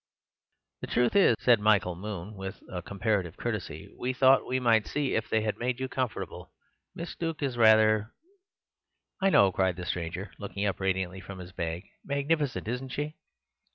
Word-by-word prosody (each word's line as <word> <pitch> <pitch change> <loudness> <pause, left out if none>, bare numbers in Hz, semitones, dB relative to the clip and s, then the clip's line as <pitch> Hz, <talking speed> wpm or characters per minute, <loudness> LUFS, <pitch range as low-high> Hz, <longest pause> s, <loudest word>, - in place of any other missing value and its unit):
"The - - -5
truth 120 +6 +1
is," 190 - +6
said 120 -3 +5
Michael 105 -4 +3
Moon 100 +1 -6
with 95 -1 -7 0.2
comparative 100 -4 -1
courtesy, - - -4
"we 130 +1 -1
thought 130 +1 +5
we 130 +1 0
might 115 -3 +3
see 145 -2 -1
if - - -1
they 110 - +2
had 105 -1 -2
made 125 +1 -1
you 130 - -2
comfortable. 130 -3 -4 0.4
Miss 170 0 -6
Duke 165 -3 -3
is 135 -3 -1
rather—" 110 -1 +5 1.1
"I 195 - +4
know," 100 - +5
cried 95 -1 +1
the 90 0 -6
stranger, 90 +4 -4
looking 100 0 -3
up 100 - -1
radiantly 95 -1 -1
from 100 0 -9
his 90 0 -9
bag; 85 0 -4 0.2
"magnificent, 140 -3 -1
isn't 125 +3 -3
she? 150 +3 -3
110 Hz, 165 wpm, -29 LUFS, 95-130 Hz, 1.1 s, is